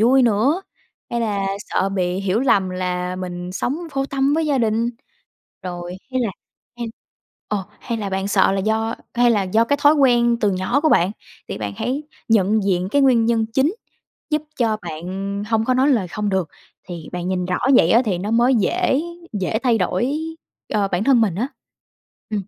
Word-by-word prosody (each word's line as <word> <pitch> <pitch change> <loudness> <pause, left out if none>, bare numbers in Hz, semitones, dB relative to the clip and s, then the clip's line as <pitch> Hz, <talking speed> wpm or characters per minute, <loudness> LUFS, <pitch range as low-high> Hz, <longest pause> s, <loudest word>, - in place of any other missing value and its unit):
vui 255 +4 +5
nữa? 245 - +2 0.5
Hay 235 0 -1
là 200 -3 -1
sợ 195 -1 -1
bị 185 -1 -1
hiểu 195 +4 0
lầm 195 -8 +2
là 180 0 -2
mình 180 -1 -5
sống 260 - -2
vô 270 0 -1
tâm 275 +1 +1
với 320 -1 +1
gia 280 -3 +1
đình? 230 +1 +1 0.7
Rồi 175 0 -6
hay 260 0 0
là 230 - +1 0.5
hay 235 - -3 0.6
ờ, 205 -2 -2 0.2
hay 235 -2 -3
là 200 -2 -3
bạn 190 +1 -1
sợ 195 - +3
là 195 - 0
do, 220 +2 0 0.2
hay 240 0 +4
là 205 -3 +2
do 215 +5 +2
cái 285 +4 0
thói 295 +2 +7
quen 240 -4 +4
từ 210 - +3
nhỏ 185 +10 0
của 315 - +3
bạn? 180 - +4 0.4
Thì - - -5
bạn 105 -1 -3
hãy 275 +4 -2 0.3
nhận 215 -1 +3
diện 185 -2 +1
cái 285 -1 +3
nguyên 240 -4 +4
nhân 230 -1 +2
chính 265 - +1 0.6
giúp 300 -1 +1 0.2
cho 225 -3 +1
bạn, 165 -1 -7
ừm, 195 +2 -4
hông 225 +1 0
có 255 - +2
nói 265 +3 +3
lời 220 -10 +2
không 210 +3 -2
được. 190 -5 0 0.4
Thì 170 -3 -7
bạn 180 0 -4
nhìn 180 -1 -1
rõ 180 0 -1 0.2
vậy 170 -7 +5
á 230 - +6
thì 185 -4 0
nó 205 +5 -3
mới 240 +3 +4
dễ 290 - +1 0.4
dễ 215 +4 -1
thay 240 -3 +3
đổi, 185 +6 0 0.6
ờ, 205 -2 +2
bản 185 +2 -1
thân 255 -3 +4
mình 195 -6 +1
á. 240 +7 -1 0.8
Ừm, 210 -2 -1
215 Hz, 200 wpm, -21 LUFS, 185-245 Hz, 0.8 s, thói